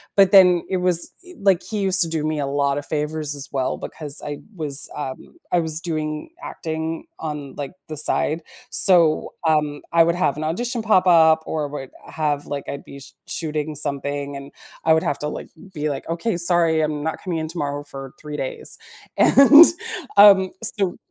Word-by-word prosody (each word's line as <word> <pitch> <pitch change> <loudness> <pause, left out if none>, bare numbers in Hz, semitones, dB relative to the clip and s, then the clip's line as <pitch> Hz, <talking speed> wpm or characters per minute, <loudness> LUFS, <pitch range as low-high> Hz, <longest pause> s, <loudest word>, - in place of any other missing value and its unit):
but 195 -2 +5
then, 180 -3 +6
it 190 - -1
was 180 -2 +1
i 360 -1 -14
like, 195 -3 +3
he 215 -2 -4
used 190 0 +4
to 170 - +3
do 160 -2 -2
me 155 -1 -1
a 140 - -1
lotta 140 0 0
favors 150 0 -3
as 140 0 -6
well, 130 -2 -1
because 150 -2 -7
I 145 -1 -5 0.2
was, 150 -4 -3
um, 140 - -7
I 175 - +3
was 160 -1 -1
doing 155 - -4
acting 160 - -5
on, 150 -3 -6
like, 145 +3 -6
the 155 - -6
side, 155 +2 0 0.3
so, 170 -5 +4
um, 150 -2 +1
I 170 0 +6
would 170 +1 +1
have 175 -5 0
an 155 - -4
audition 235 +10 -2
pop 200 -4 +3
up 160 -3 +5
or 155 -2 -2
would 140 -2 -7 0.2
have, 150 -2 -2
like, 140 -1 -5
I'd 140 - -6
be 140 - -11
sh 140 0 -14
shooting 155 -1 -3
something, 140 0 -3
and 140 +1 -9 0.3
I 160 - +5
would 160 - +1
have 145 - -1
to, 150 - -3
like, - - -6 0.2
be 150 -2 -2
like, 135 +2 -6
"Okay, 170 +6 -1
sorry, 170 -2 +2
I'm 150 -1 -2
not 160 0 -3
coming 180 -3 -2
in 160 - -3
tomorrow, 145 -3 -4
for 135 -2 -9
3 150 -1 -7
days." 135 -2 -5 0.4
And, 290 +4 +8 0.5
um, 195 -2 +8
so 195 -3 -1
155 Hz, 190 wpm, -21 LUFS, 145-175 Hz, 0.5 s, And